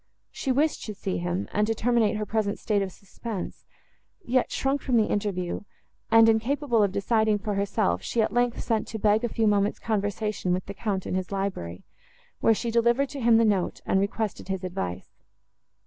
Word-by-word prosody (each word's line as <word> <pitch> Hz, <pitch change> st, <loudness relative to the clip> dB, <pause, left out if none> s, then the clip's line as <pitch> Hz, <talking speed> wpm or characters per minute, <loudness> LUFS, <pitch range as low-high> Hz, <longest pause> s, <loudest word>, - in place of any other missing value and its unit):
She 270 Hz, -, -2 dB
wished 295 Hz, +4 st, +1 dB
to 215 Hz, -, -6 dB
see 90 Hz, -, -3 dB
him, 90 Hz, +3 st, -2 dB
and 210 Hz, +1 st, +1 dB
to 225 Hz, -, 0 dB
terminate 225 Hz, -2 st, +2 dB
her 210 Hz, -, -2 dB
present 210 Hz, -1 st, -1 dB
state 205 Hz, -2 st, 0 dB
of 195 Hz, -1 st, -2 dB
suspense, 200 Hz, +2 st, -7 dB, 0.6 s
yet 255 Hz, +1 st, +1 dB
shrunk 275 Hz, +1 st, 0 dB
from 250 Hz, -3 st, +1 dB
the 220 Hz, -, +4 dB
interview, 195 Hz, -5 st, -2 dB, 0.5 s
and, 225 Hz, 0 st, +7 dB
incapable 235 Hz, +2 st, +2 dB
of 200 Hz, -2 st, +3 dB
deciding 215 Hz, +2 st, +2 dB
for 210 Hz, +1 st, -3 dB
herself, 195 Hz, -, 0 dB
she, 235 Hz, -, -2 dB
at 215 Hz, -1 st, +2 dB
length, 245 Hz, 0 st, +1 dB
sent 225 Hz, -2 st, 0 dB
to 225 Hz, -, -5 dB
beg 215 Hz, +2 st, +3 dB
a 240 Hz, -, 0 dB
few 225 Hz, 0 st, 0 dB
moments' 205 Hz, 0 st, +2 dB
conversation 205 Hz, -3 st, -1 dB
with 180 Hz, 0 st, -2 dB
the 200 Hz, -, -6 dB
Count 200 Hz, -3 st, -2 dB
in -, -, -3 dB
his 185 Hz, 0 st, -2 dB
library, 190 Hz, -, -3 dB, 0.6 s
where 225 Hz, -, +4 dB
she 235 Hz, +2 st, -2 dB
delivered 235 Hz, +4 st, +2 dB
to 280 Hz, 0 st, -6 dB
him 230 Hz, -1 st, +5 dB
the 230 Hz, -, +4 dB
note, 200 Hz, -4 st, +1 dB
and 190 Hz, -, +2 dB
requested 205 Hz, +1 st, -2 dB
his 190 Hz, -1 st, -3 dB
advice. 95 Hz, -, -5 dB
210 Hz, 195 wpm, -26 LUFS, 195-230 Hz, 0.6 s, and